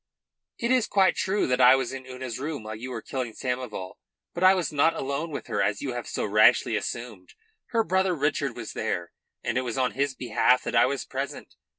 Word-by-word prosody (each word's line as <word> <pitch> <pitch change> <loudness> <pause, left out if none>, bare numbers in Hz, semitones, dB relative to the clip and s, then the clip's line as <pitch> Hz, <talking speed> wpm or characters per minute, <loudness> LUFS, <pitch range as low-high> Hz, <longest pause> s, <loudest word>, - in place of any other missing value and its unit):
"It 235 +1 -1
is 255 -3 +3
quite 195 -2 +3
true 200 +2 0
that 125 0 +1
I 125 +1 +8
was 130 -1 -2
in 130 -1 -7
Una's 130 -2 -6
room 145 -3 -4
while 110 0 -6
you 120 +4 -7
were 115 -3 -5
killing 125 -4 -4
Samoval. 125 -7 -4 0.3
But 175 - -3
I 190 +1 +7
was 180 -3 -1
not 155 +3 +3
alone 140 +5 -3
with 145 - -6
her, 105 -4 -1
as 100 +5 0
you 135 -3 -2
have 120 -1 -5
so - - -2
rashly 110 +2 +4
assumed. 110 -4 -5 0.3
Her 230 -2 +1
brother 190 -1 +1
Richard 145 -3 -1
was 115 -3 -7
there, 90 -6 -3 0.3
and - - 0
it - - 0
was 125 -1 -4
on 130 -1 +1
his 140 0 -1
behalf 125 0 +2
that - - -3
I 115 - +6
was 140 0 -3
present. - - -5
130 Hz, 220 wpm, -26 LUFS, 115-150 Hz, 0.3 s, I